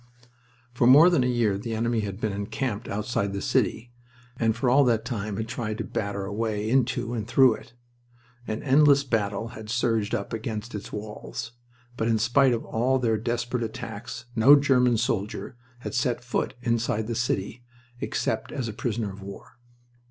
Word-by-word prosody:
For 120 Hz, 0 st, +2 dB
more 150 Hz, +8 st, +8 dB
than 145 Hz, -8 st, +3 dB
a -, -, +1 dB
year 115 Hz, -5 st, +1 dB
the 115 Hz, +1 st, -4 dB
enemy 115 Hz, +1 st, 0 dB
had 100 Hz, -2 st, -4 dB
been 110 Hz, -3 st, -1 dB
encamped 110 Hz, +3 st, -3 dB
outside 100 Hz, -1 st, -2 dB
the 100 Hz, -, -2 dB
city, 120 Hz, +4 st, 0 dB, 0.4 s
and 115 Hz, -1 st, +1 dB
for 120 Hz, +3 st, -1 dB
all 135 Hz, +4 st, +5 dB
that 115 Hz, -2 st, +1 dB
time 105 Hz, -4 st, -3 dB
had 110 Hz, 0 st, -3 dB
tried 110 Hz, -2 st, -4 dB
to -, -, -3 dB
batter 100 Hz, -1 st, -3 dB
a 100 Hz, -, -5 dB
way 110 Hz, -1 st, -2 dB
into 125 Hz, -1 st, +1 dB
and 110 Hz, -3 st, -3 dB
through 130 Hz, +1 st, +5 dB
it. 120 Hz, -1 st, -12 dB, 0.7 s
An 110 Hz, +1 st, -3 dB
endless 140 Hz, 0 st, +5 dB
battle 115 Hz, -3 st, -1 dB
had 110 Hz, -3 st, -10 dB
surged 115 Hz, -2 st, 0 dB
up 100 Hz, -1 st, -4 dB
against 110 Hz, 0 st, -4 dB
its 105 Hz, -1 st, -6 dB
walls, 105 Hz, +2 st, -6 dB, 0.5 s
but 115 Hz, -, 0 dB
in 115 Hz, -1 st, +3 dB
spite 125 Hz, +5 st, +3 dB
of 115 Hz, -1 st, -1 dB
all 125 Hz, +4 st, +1 dB
their 115 Hz, -4 st, +1 dB
desperate 120 Hz, +2 st, -2 dB
attacks 115 Hz, +1 st, -6 dB
no 125 Hz, +6 st, +8 dB
German 125 Hz, -4 st, +3 dB
soldier 105 Hz, +1 st, -2 dB, 0.3 s
had -, -, -5 dB
set 125 Hz, -1 st, 0 dB
foot 120 Hz, -, -2 dB
inside 115 Hz, -2 st, 0 dB
the 115 Hz, -, -3 dB
city 115 Hz, 0 st, -2 dB, 0.4 s
except 110 Hz, -2 st, -2 dB
as 130 Hz, -5 st, -3 dB
a 110 Hz, -, -5 dB
prisoner 110 Hz, -2 st, -2 dB
of 100 Hz, -, -11 dB
war. 100 Hz, +4 st, -11 dB
115 Hz, 180 wpm, -26 LUFS, 105-125 Hz, 0.7 s, more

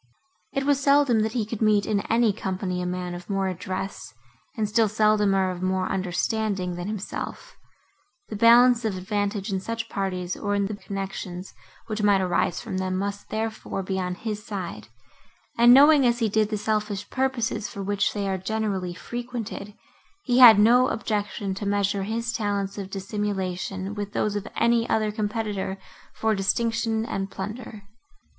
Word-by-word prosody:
It 275 Hz, -, -1 dB
was 285 Hz, -1 st, +2 dB
seldom, 280 Hz, -4 st, +4 dB
that 220 Hz, 0 st, 0 dB
he 235 Hz, -4 st, 0 dB
could 220 Hz, +1 st, -6 dB
meet 210 Hz, -2 st, +3 dB
in 210 Hz, -2 st, +1 dB
any 230 Hz, -2 st, +3 dB
company 185 Hz, -2 st, -3 dB
a 180 Hz, -, -2 dB
man 180 Hz, 0 st, -3 dB
of 175 Hz, +2 st, -9 dB
more 195 Hz, -1 st, 0 dB
address, 185 Hz, -, -5 dB, 0.4 s
and 215 Hz, -1 st, 0 dB
still 220 Hz, +1 st, +3 dB
seldomer 210 Hz, -3 st, +3 dB
one 185 Hz, -, -3 dB
of 175 Hz, -, -9 dB
more 185 Hz, 0 st, 0 dB
understanding, 190 Hz, +1 st, -1 dB
than 175 Hz, +1 st, -5 dB
himself; 210 Hz, -2 st, -6 dB, 0.7 s
the 215 Hz, -, -6 dB
balance 240 Hz, +2 st, +6 dB
of 210 Hz, -4 st, -1 dB
advantage 205 Hz, +1 st, -2 dB
in 190 Hz, -, 0 dB
such 230 Hz, +3 st, -4 dB
parties, 185 Hz, -3 st, -2 dB
or 205 Hz, -1 st, -2 dB
in 200 Hz, 0 st, +1 dB
the 210 Hz, +1 st, -4 dB
connections, 195 Hz, -2 st, -6 dB, 0.3 s
which 215 Hz, -1 st, -3 dB
might 205 Hz, -2 st, +4 dB
arise 180 Hz, -2 st, 0 dB
from 185 Hz, -, -4 dB
them, 185 Hz, 0 st, -1 dB
must, 200 Hz, +1 st, -4 dB
therefore, 220 Hz, -3 st, -3 dB
be 190 Hz, 0 st, -2 dB
on 180 Hz, -1 st, -2 dB
his 210 Hz, 0 st, -5 dB
side; 185 Hz, -, -6 dB, 0.7 s
and, 240 Hz, +1 st, +7 dB
knowing, 285 Hz, +2 st, +8 dB
as 240 Hz, -1 st, +3 dB
he 225 Hz, -3 st, +1 dB
did, 215 Hz, 0 st, +2 dB
the 215 Hz, -, -1 dB
selfish 210 Hz, -1 st, -2 dB
purposes, 250 Hz, -5 st, -1 dB
for 200 Hz, -, -6 dB
which 200 Hz, +1 st, +1 dB
they 200 Hz, -1 st, -3 dB
are 190 Hz, -1 st, -1 dB
generally 190 Hz, -3 st, -2 dB
frequented, 235 Hz, -3 st, -6 dB, 0.5 s
he 250 Hz, -1 st, +2 dB
had 235 Hz, -5 st, +10 dB
no 240 Hz, +4 st, +5 dB
objection 205 Hz, -2 st, -2 dB
to 200 Hz, +1 st, -4 dB
measure 200 Hz, 0 st, +1 dB
his 230 Hz, +4 st, -2 dB
talents 200 Hz, -2 st, -2 dB
of 195 Hz, -1 st, -6 dB
dissimulation 195 Hz, -1 st, -3 dB
with 205 Hz, 0 st, -5 dB
those 210 Hz, 0 st, 0 dB
of 205 Hz, 0 st, -3 dB
any 235 Hz, 0 st, +2 dB
other 215 Hz, -1 st, +1 dB
competitor 210 Hz, -2 st, -3 dB, 0.3 s
for 220 Hz, 0 st, 0 dB
distinction 225 Hz, +2 st, 0 dB
and 195 Hz, -3 st, -3 dB
plunder. 210 Hz, +2 st, -7 dB
205 Hz, 170 wpm, -25 LUFS, 190-225 Hz, 0.7 s, had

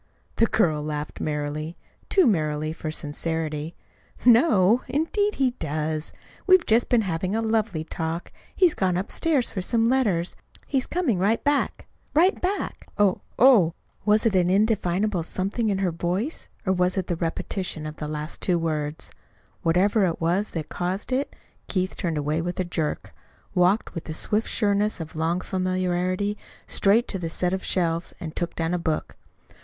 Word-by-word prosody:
The 230 Hz, -, +4 dB
girl 155 Hz, -10 st, +2 dB
laughed 150 Hz, 0 st, -4 dB
merrily 150 Hz, +2 st, -3 dB, 0.3 s
too 380 Hz, -, +5 dB
merrily 155 Hz, -, +1 dB
for 160 Hz, -1 st, -5 dB
sincerity. 155 Hz, +1 st, -3 dB, 0.5 s
"Know? 235 Hz, -, +5 dB
Indeed 405 Hz, +8 st, 0 dB
he 265 Hz, -2 st, +2 dB
does. 155 Hz, -4 st, -3 dB, 0.4 s
We've 370 Hz, -2 st, +6 dB
just 225 Hz, +2 st, +3 dB
been 235 Hz, -3 st, +4 dB
having 185 Hz, +2 st, -1 dB
a -, -, +1 dB
lovely 220 Hz, -7 st, 0 dB
talk. 165 Hz, +1 st, -4 dB, 0.2 s
He's 360 Hz, -4 st, +4 dB
gone 185 Hz, -2 st, +1 dB
upstairs 260 Hz, -, 0 dB
for 190 Hz, -, -3 dB
some 225 Hz, +4 st, +1 dB
letters. 215 Hz, -9 st, +1 dB, 0.3 s
He's 270 Hz, -3 st, -1 dB
coming 305 Hz, -, 0 dB
right 210 Hz, +5 st, +2 dB
back 290 Hz, 0 st, 0 dB, 0.3 s
right 355 Hz, +5 st, +4 dB
back." 385 Hz, +3 st, -2 dB
"Oh 200 Hz, -3 st, +3 dB, 0.2 s
h!" 225 Hz, -10 st, +6 dB, 0.3 s
Was 215 Hz, +2 st, +3 dB
it 220 Hz, -4 st, +3 dB
an 180 Hz, -1 st, +3 dB
indefinable 200 Hz, -1 st, +2 dB
something 195 Hz, +7 st, -2 dB
in 195 Hz, -, +1 dB
her 190 Hz, -2 st, 0 dB
voice, 180 Hz, -, -3 dB, 0.2 s
or 190 Hz, -, +3 dB
was 180 Hz, +1 st, +1 dB
it 190 Hz, -, 0 dB
the 175 Hz, -, -1 dB
repetition 165 Hz, 0 st, -3 dB
of 155 Hz, 0 st, -6 dB
the 150 Hz, -, -4 dB
last 150 Hz, +1 st, -5 dB
two 180 Hz, -2 st, +2 dB
words? 155 Hz, -2 st, -3 dB, 0.5 s
Whatever 190 Hz, +4 st, +3 dB
it 165 Hz, -, -2 dB
was 175 Hz, +6 st, +1 dB
that 155 Hz, -, -4 dB
caused 185 Hz, +6 st, -3 dB
it, 265 Hz, +3 st, -1 dB, 0.3 s
Keith 185 Hz, -1 st, -1 dB
turned 165 Hz, -3 st, -2 dB
away 150 Hz, +2 st, 0 dB
with 175 Hz, +2 st, -4 dB
a -, -, +2 dB
jerk, 160 Hz, -3 st, -3 dB, 0.4 s
walked 180 Hz, +5 st, +2 dB
with 165 Hz, -, -6 dB
the 155 Hz, -, -5 dB
swift 215 Hz, +6 st, 0 dB
sureness 210 Hz, -1 st, +1 dB
of 160 Hz, -1 st, -7 dB
long 165 Hz, +3 st, 0 dB
familiarity 185 Hz, +2 st, -1 dB, 0.3 s
straight 215 Hz, +5 st, +3 dB
to 190 Hz, -, -2 dB
the 165 Hz, -2 st, -3 dB
set 180 Hz, +2 st, 0 dB
of 190 Hz, -, -2 dB
shelves 170 Hz, -2 st, -1 dB
and 160 Hz, -1 st, -6 dB
took 175 Hz, -1 st, -3 dB
down 165 Hz, +1 st, -1 dB
a 180 Hz, -, 0 dB
book. 160 Hz, -2 st, -2 dB
185 Hz, 165 wpm, -25 LUFS, 165-215 Hz, 0.5 s, We've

